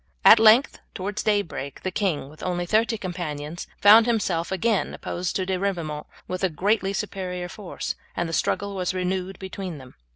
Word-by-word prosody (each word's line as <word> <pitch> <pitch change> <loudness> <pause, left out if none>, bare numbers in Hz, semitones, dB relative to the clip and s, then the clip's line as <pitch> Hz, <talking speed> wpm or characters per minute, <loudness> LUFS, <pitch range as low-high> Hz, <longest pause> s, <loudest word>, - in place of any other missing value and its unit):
At 220 - +10
length 225 +4 +5 0.2
towards 200 +2 -3
daybreak 200 -10 -2
the 185 - -2
king, 180 -8 -1
with 155 +2 -14
only 175 -1 -2
thirty 220 +4 +2
companions, 165 -4 -5
found 220 +3 +8
himself 190 -8 0
again 205 +2 0
opposed 180 0 -4
to 190 - 0
De 185 -1 -1
Ribaumont 170 -6 -3 0.2
with 185 +1 -4
a 190 - +3
greatly 195 +4 +1
superior 185 -3 -4
force, 190 0 -5 0.2
and 175 - 0
the 165 - -5
struggle 200 +4 0
was 185 0 -2
renewed 185 0 -2
between 190 -3 -6
them. 130 -2 -13
185 Hz, 170 wpm, -25 LUFS, 175-205 Hz, 0.2 s, At